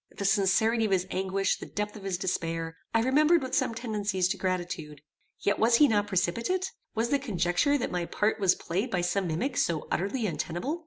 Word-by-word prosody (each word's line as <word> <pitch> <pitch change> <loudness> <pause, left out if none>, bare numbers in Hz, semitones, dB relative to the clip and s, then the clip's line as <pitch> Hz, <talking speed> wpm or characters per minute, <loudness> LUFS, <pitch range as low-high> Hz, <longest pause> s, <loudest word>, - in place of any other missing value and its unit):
The 200 - -3
sincerity 210 +4 +3
of - - -1
his 185 -1 +2
anguish, 190 +1 0
the - - -8
depth 210 +1 -4
of 210 - -9
his 195 -2 -2
despair, 165 -3 -2 0.2
I 225 0 +2
remembered 300 +5 +4
with 260 - -5
some 230 - +1
tendencies 205 -5 -1
to 195 - -1
gratitude. 175 -5 -3 0.4
Yet 205 - +1
was 230 +1 +4
he 295 +5 +6
not 205 -3 +1
precipitate? 230 - 0 0.2
Was 230 +1 0
the 280 - +2
conjecture 220 - +1
that 255 - -3
my 175 -1 -2
part 215 +1 0
was 195 -3 +4
played 195 +9 -2
by 180 -5 0
some 180 +2 0
mimic 245 - -2
so 160 -3 0
utterly 215 +6 -1
untenable? 195 - -3
200 Hz, 200 wpm, -28 LUFS, 180-235 Hz, 0.4 s, he